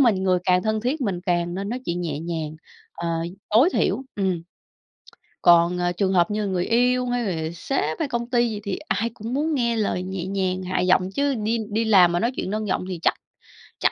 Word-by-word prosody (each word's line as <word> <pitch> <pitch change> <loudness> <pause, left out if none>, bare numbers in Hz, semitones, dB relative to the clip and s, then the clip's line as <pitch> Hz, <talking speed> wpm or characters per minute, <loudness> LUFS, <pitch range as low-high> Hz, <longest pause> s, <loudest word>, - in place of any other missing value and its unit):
mình, 220 -8 +4
người 185 -1 +3
càng 180 -1 +3
thân 220 +1 0
thiết 260 +7 -1
mình 195 -8 -1
càng 175 -1 0
nên 195 +2 -3
nói 245 +3 -3
chuyện 170 +1 -2
nhẹ 160 -5 -3
nhàng, 160 -1 -4 0.4
ờ, 170 - -4 0.4
tối 230 +10 +6
thiểu, - - +1
ừm. 190 -4 -1 1.0
Còn, 170 +1 +5
ờ, 175 0 0
trường 190 +2 0
hợp 175 +1 +3
như 210 +1 -1
là 205 - -1
người 185 -2 -1
yêu, 250 +2 +2
hay 245 0 -1
là 160 0 -3
sếp, 160 - -2
hay 310 - 0
công 240 -2 -3
ty 240 -1 +2
gì 215 -2 -4
thì 200 -3 -3
ai 230 +2 0
cũng 225 +3 -6
muốn 305 +4 0
nghe 235 -3 +1
lời 205 -4 -1
nhẹ 185 -1 -4
nhàng, 185 -1 -1
hạ 185 0 -1
giọng, 185 +1 +2
chứ 280 +5 0
đi 220 +1 0
đi 225 +2 0
làm 190 -5 +6
mà 175 - +1
nói 235 +5 +1
chuyện - - -3
nâng 215 +1 -2
giọng 185 - -1
thì 180 -3 -4
chắc - - +3 0.7
chắc - - +3
195 Hz, 230 wpm, -23 LUFS, 175-235 Hz, 1.0 s, tối